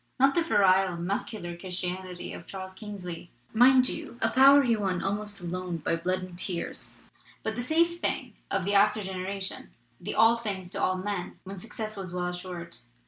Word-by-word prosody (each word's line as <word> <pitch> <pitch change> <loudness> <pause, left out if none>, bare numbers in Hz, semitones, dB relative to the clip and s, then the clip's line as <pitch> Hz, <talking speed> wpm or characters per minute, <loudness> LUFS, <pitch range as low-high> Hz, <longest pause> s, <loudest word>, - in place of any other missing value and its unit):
Not 270 +1 +5
the 340 - +3
virile 190 - +4
'muscular 175 0 -3
Christianity' 180 0 -5
of - - -9
Charles 190 -1 -7
Kingsley, 185 -5 -7 0.2
mind 255 +2 +6
you 240 - -5
a 225 - +1
power 275 +2 +8
he 235 -3 +3
won 190 -4 -1
almost 205 +1 -1
alone, 180 0 -3
by 165 - 0
blood 185 +2 -1
and 185 -1 -8
tears; 175 -1 -1 0.5
but 220 - -1
the 240 - -3
'safe' 335 +6 +2
thing - - -1 0.2
of 195 -2 0
the 200 - +1
after 210 +1 +4
generation, 190 +1 -5 0.3
the 195 - -4
'all 225 +1 +6
things 195 -6 -4
to - - -4
all 185 0 +2
men' 190 -1 -4
when 195 0 -7
success 215 +1 -5
was 190 -3 -6
well 180 0 -1
as 180 0 -5
sured. 170 -6 -8
190 Hz, 185 wpm, -28 LUFS, 180-215 Hz, 0.5 s, power